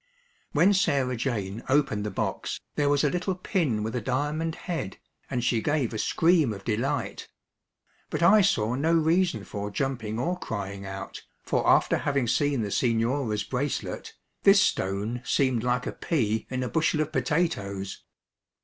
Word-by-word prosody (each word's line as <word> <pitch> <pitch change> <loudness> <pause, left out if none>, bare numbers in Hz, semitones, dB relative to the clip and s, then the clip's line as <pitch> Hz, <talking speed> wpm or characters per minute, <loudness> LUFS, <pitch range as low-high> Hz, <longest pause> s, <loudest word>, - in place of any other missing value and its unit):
When 175 +7 +4
Sarah 140 -9 +1
Jane 110 -4 -3
opened 130 -7 +2
the - - -2
box, 95 - -3
there 145 -1 +1
was 145 0 +3
a 150 - +3
little 180 +1 -1
pin 155 - 0
with 110 +3 -3
a 125 - -1
diamond 150 +7 -1
head, 165 - -4 0.3
and 120 -2 -1
she 120 -2 +1
gave 145 -5 0
a 110 - -3
scream 165 -4 +3
of 100 -1 -9
delight. 130 +6 -2 0.8
But - - -1
I 210 +5 +7
saw 115 - +2
no 155 +6 +2
reason 165 - +2
for 105 0 -5
jumping 115 -2 -2
or 175 +9 -1
crying 100 -2 -5
out, 95 0 -7 0.2
for - - +1
after - - +4
having 140 -4 0
seen 140 -1 +1
the 100 - -4
Signora's 115 -2 +1
bracelet, 130 +6 -3 0.3
this 195 0 +7
stone 105 - 0
seemed 130 -3 +1
like 125 0 0
a - - -2
pea 110 -9 -1
in 130 0 -2
a - - -2
bushel 160 +1 +1
of 155 0 -2
potatoes. 115 - -1
130 Hz, 160 wpm, -27 LUFS, 110-155 Hz, 0.8 s, I